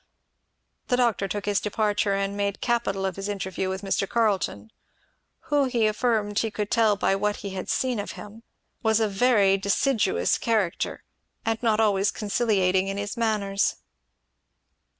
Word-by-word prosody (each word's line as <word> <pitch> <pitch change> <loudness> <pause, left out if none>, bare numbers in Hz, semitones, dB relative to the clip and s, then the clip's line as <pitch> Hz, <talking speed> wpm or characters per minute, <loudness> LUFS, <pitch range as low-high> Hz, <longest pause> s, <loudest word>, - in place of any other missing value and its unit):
The 245 - +2
doctor 235 -5 +1
took 205 +2 -4
his 205 -1 +1
departure 210 -1 0
and 195 0 -2
made 200 -1 -2
capital 230 -5 0
of 190 -1 -3
his 195 +1 -4
interview 190 -2 -3
with 190 +1 -4
Mr. 195 0 -1
Carleton; 220 -1 0 0.8
who 290 -1 +4
he 240 -4 +1
affirmed 215 -1 +1
he 225 - 0
could 210 -1 -4
tell 225 -3 +4
by 195 -1 +1
what 205 +1 0
he 200 - -4
had 190 -1 -5
seen 255 -4 0
of 205 - -5
him 210 +2 -11 0.4
was 220 0 +2
a 220 - +2
very 200 -2 +3
deciduous 200 - +1
character, 215 -7 -1 0.4
and 225 0 -1
not 225 -2 +2
always 205 -2 +3
conciliating 195 -3 +1
in 195 0 -3
his 205 +2 -4
manners. 210 -4 0
205 Hz, 155 wpm, -25 LUFS, 195-225 Hz, 0.8 s, who